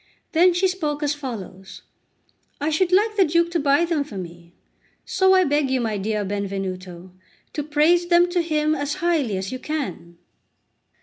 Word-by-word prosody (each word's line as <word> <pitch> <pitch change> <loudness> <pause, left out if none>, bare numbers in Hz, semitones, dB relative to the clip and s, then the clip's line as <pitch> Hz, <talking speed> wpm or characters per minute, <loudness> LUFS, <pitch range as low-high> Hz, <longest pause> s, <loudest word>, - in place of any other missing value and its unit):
Then 350 +3 +5
she 380 +2 +3
spoke 305 -5 -3
as 290 0 +1
follows: 205 -9 -8 0.8
"I 295 +2 -1
should 350 +4 +1
like 425 +4 +3
the 390 - +6
Duke 340 +1 +1
to 340 - 0
buy 285 +3 +3
them 330 -4 0
for 225 -8 -10
me; 170 -1 -10 0.5
so 380 0 +3
I 370 - +5
beg 290 -3 +1
you, 260 0 +1
my 220 -4 -2
dear 210 +1 -2
Benvenuto, 190 -2 -5 0.4
to 300 - -2
praise 310 +4 +2
them 345 0 +5
to 350 -1 +1
him 310 -2 0
as 290 -1 -2
highly 310 - 0
as 190 0 -4
you 255 - -5
can." 220 - -5
295 Hz, 175 wpm, -22 LUFS, -, 0.8 s, the